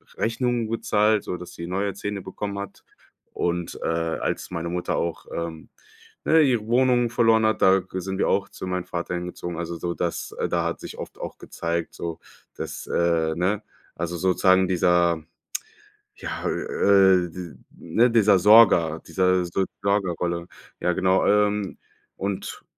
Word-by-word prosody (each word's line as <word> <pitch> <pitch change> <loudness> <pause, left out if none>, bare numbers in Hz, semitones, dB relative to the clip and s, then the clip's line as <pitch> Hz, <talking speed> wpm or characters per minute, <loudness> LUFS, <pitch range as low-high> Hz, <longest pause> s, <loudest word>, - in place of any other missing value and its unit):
Rechnungen 120 0 0
gezahlt, 105 -2 +2
sodass 90 -1 -6
sie 85 - -7
neue 100 +2 -1
Zähne 100 0 -4
bekommen 100 +2 -5
hat. 100 -1 -8 0.5
Und, 85 -1 -2
äh, - - -1
als 80 0 -2
meine 85 0 -3
Mutter 90 0 -2
auch, 85 -1 -2
ähm, 85 -1 -5 0.6
ne, 160 0 +5
ihre 120 -7 +2
Wohnung 125 0 +3
verloren 115 -2 +3
hat, 110 -1 +1
da 95 0 +6
g 95 0 -6
sind 95 +1 -4
wir - - +1
auch 100 0 +1
zu - - -8
meinem 90 -1 -2
Vater 85 +1 -4
hingezogen. 90 -1 -5
Also 85 0 -4
so 85 +1 -3
dass 85 -1 -3
äh, - - +1
da - - +1
hat - - -2
sich - - -9
oft - - -8
auch - - -6
gezeigt 85 0 -4
so, 85 -1 -5 0.4
dass, - - -6
äh, 85 -2 +1
ne 95 +5 0 0.3
also 85 +1 -3
sozusagen 95 +1 +3
dieser, 85 -3 +2 0.9
ja, - - -6
äh, 95 -3 +3
d 85 -5 -8 0.2
ne, 115 +9 +2
dieser 105 -4 +5
Sorger, 90 -6 +6
diese 90 -1 +2
So 90 +2 -1 0.2
Sorgerrolle. 90 -3 -1 0.3
Ja, 90 0 +1
genau, 95 +1 +2
ähm, 105 -1 +2 0.4
und 100 -1 -4
95 Hz, 155 wpm, -24 LUFS, 85-105 Hz, 0.9 s, da